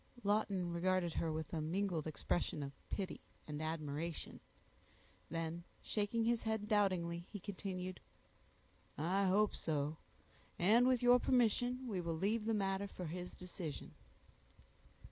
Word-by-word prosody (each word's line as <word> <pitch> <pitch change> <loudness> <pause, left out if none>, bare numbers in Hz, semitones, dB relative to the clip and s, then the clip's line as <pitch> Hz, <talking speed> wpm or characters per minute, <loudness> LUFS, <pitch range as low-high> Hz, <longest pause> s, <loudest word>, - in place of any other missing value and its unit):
Lawton 200 -4 +1
regarded 175 -1 +2
her 165 - 0
with 155 +1 -4
a 160 - 0
mingled 170 0 0
expression 155 0 -1
of 140 - -4 0.2
pity 190 -3 -3 0.3
and 150 0 -4
admiration; 155 +1 -3 0.9
then 165 +1 -2 0.2
shaking 215 +2 0
his 235 0 +3
head 220 -2 -1
doubtingly, 180 -5 +2
he 205 - -5
continued,— 185 -2 -4 1.0
"I 185 +6 +2
hope 200 +3 +4
so; 150 -1 -1 0.6
and 225 +8 +6
with 255 -1 +3
your 245 0 +8
permission, 245 +1 +2
we 195 -6 -1
will 165 -1 -2
leave 210 +5 +1
the 225 0 +2
matter 195 0 0
for 185 -2 -6
his 180 +2 -5
decision." 175 -5 -6
185 Hz, 130 wpm, -38 LUFS, 165-210 Hz, 1.0 s, your